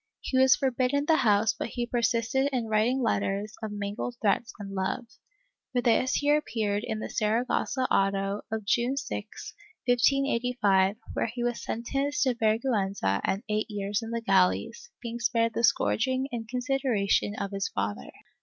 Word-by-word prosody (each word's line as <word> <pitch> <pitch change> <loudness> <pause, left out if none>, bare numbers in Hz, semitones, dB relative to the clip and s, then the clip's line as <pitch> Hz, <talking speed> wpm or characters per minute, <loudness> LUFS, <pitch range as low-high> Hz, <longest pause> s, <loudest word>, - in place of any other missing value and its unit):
He - - -4
was 265 0 +6
forbidden 265 +2 0
the 320 +1 +4
house 210 0 +3
but - - -4
he 240 0 -3
persisted 240 +2 +1
in 250 -3 -1
writing 230 +5 +2
letters 205 -1 -1
of 220 -1 -4
mingled 205 +4 -4
threats 220 +2 +1
and 200 -2 -7
love. 190 +5 -2 0.7
For 245 - +2
this 245 +1 +2
he 290 0 +2
appeared 215 -8 -1
in 225 -3 -3
the 215 - -4
Saragossa 235 +4 0
auto 195 -4 +1
of 220 -2 -3
June 240 +6 +1
6, - - -6 0.3
1585, 240 -6 +2 0.2
where - - 0
he 240 -1 -4
was 240 -1 -2
sentenced 275 +5 -1
to 260 -2 +2
vergiienza 215 - 0
and 195 +4 -1
eight 215 +1 -1
years 205 +1 -2
in 225 - -6
the 230 0 -2
galleys, 195 - +1
being 235 0 -5
spared 230 -1 +1
the 230 - -2
scourging 260 +4 +2
in 230 -2 -5
consideration 250 -5 0
of 200 -1 -4
his 195 -1 -2
father. 100 -8 -3
230 Hz, 160 wpm, -28 LUFS, 205-250 Hz, 0.7 s, was